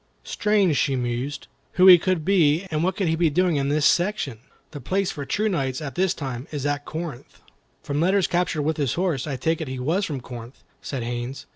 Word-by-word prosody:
"Strange," 200 -8 +1
she 140 -3 +1
mused, 125 +3 -3 0.3
"who 185 - +4
he 180 -2 +10
could 175 -3 -1
be, 170 -4 +3
and 155 +1 0
what 185 +1 0
he 200 - 0
could 160 -1 0
be 170 -2 +4
doing 175 +1 +1
in 140 0 0
this 145 0 +1
section. 175 - +1 0.3
The 145 -3 -8
place 195 +8 -1
for 140 - -6
true 215 +1 0
knights, 135 -10 -1
at 145 -3 -6
this 185 0 +1
time, 130 -2 -5
is 145 -3 -4
at 145 0 -1
Corinth." 155 -6 -7 0.4
"From 145 +1 -2
letters 190 +2 +3
captured 175 -3 0
with 155 +1 -1
his 140 -6 0
horse, 170 -7 -1
I 140 - -2
take 160 +5 -1
it 160 - -4
he 130 0 -5
was 160 +11 0
from 145 -7 -3
Corinth," 120 0 -10 0.2
said 130 -4 -4
Haines. 120 +3 -5
150 Hz, 220 wpm, -24 LUFS, 135-180 Hz, 0.4 s, he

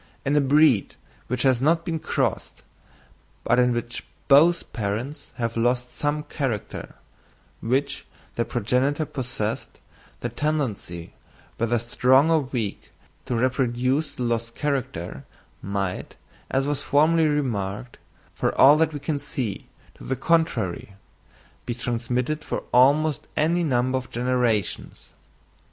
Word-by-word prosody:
In 140 +2 +1
a 150 - +5
breed 140 -5 +4 0.3
which 125 0 -1
has 130 -3 +3
not 165 +4 +2
been 165 -3 -2
crossed, - - -2 0.8
but - - +3
in 125 0 +4
which 120 0 -3 0.2
both 160 +5 +5
parents 120 +7 -4
have 115 -1 -2
lost 125 +2 0
some 150 +1 -1
character 135 - -4 0.7
which 140 +4 -1 0.3
their 115 - 0
progenitor 130 +7 0
possessed, 120 -6 -4 0.4
the 120 - -2
tendency, 120 - -3 0.4
whether 115 +1 +1
strong 130 +6 +3
or 160 - +5
weak, 125 -7 -4 0.4
to 125 - -1
reproduce 130 +4 0
the 125 - -3
lost 115 -1 -2
character 130 - -3 0.4
might, 100 -1 -3 0.3
as 135 +1 +1
was 145 -1 -1
formerly 155 +2 +3
remarked, 120 -6 -2 0.3
for - - -1
all 145 +3 +8
that 160 0 +2
we 145 - -4
can 145 0 -2
see 115 -8 -4 0.3
to - - -15
the 130 - -2
contrary, 115 - 0 0.7
be 120 - -2
transmitted 125 +5 -2
for - - -3
almost 145 +4 +4
any 170 +3 +2
number 130 -3 +1
of 130 - -11
generations. 120 -5 -1
130 Hz, 125 wpm, -24 LUFS, 115-145 Hz, 0.8 s, all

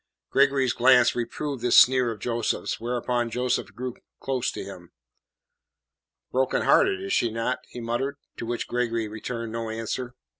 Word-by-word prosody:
Gregory's 135 -2 +3
glance 125 0 +5
reproved 130 +3 -3
this 125 - +4
sneer 130 -1 +6
of 115 - -4
Joseph's, 115 +1 -2
whereupon 120 0 -1
Joseph 125 -2 -1
drew 125 +1 -4 0.3
close 130 -2 -1
to - - -6
him: 90 -3 -10 1.4
"Broken 130 +1 +1
hearted, 395 0 +3
is 390 - -2
she 120 - +2
not?" 115 +3 -2
he - - -8
muttered, 120 +4 -2 0.2
to 115 - -5
which 120 0 -3
Gregory 115 -2 -1
returned 115 +2 -5
no 115 0 -4
answer. 115 +3 -4
120 Hz, 150 wpm, -26 LUFS, 115-130 Hz, 1.4 s, sneer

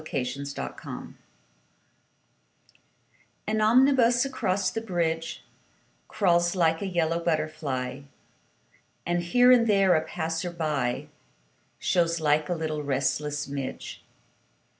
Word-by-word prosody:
SYMPHONY 125 -4 -3
IN 140 0 -6
YELLOW - - -7 2.3
AN 215 0 0
omnibus 245 +1 +4
across 200 -8 -1
the 225 - -3
bridge 165 -5 -2 0.6
Crawls 175 -2 +2
like 165 -2 +2
a 200 - -2
yellow 170 -2 0
butterfly 155 -5 -2 1.0
And, 175 0 0
here 245 +9 +4
and 240 -2 +5
there, 195 -3 +4
a 160 - +3
passer 160 +1 -3
by 150 -8 -2 0.7
Shows 170 -2 +1
like 150 -1 +1
a 175 - 0
little 155 -2 -3
restless 145 +1 -1
midge. 140 -1 -6
165 Hz, 105 wpm, -26 LUFS, 150-190 Hz, 2.3 s, and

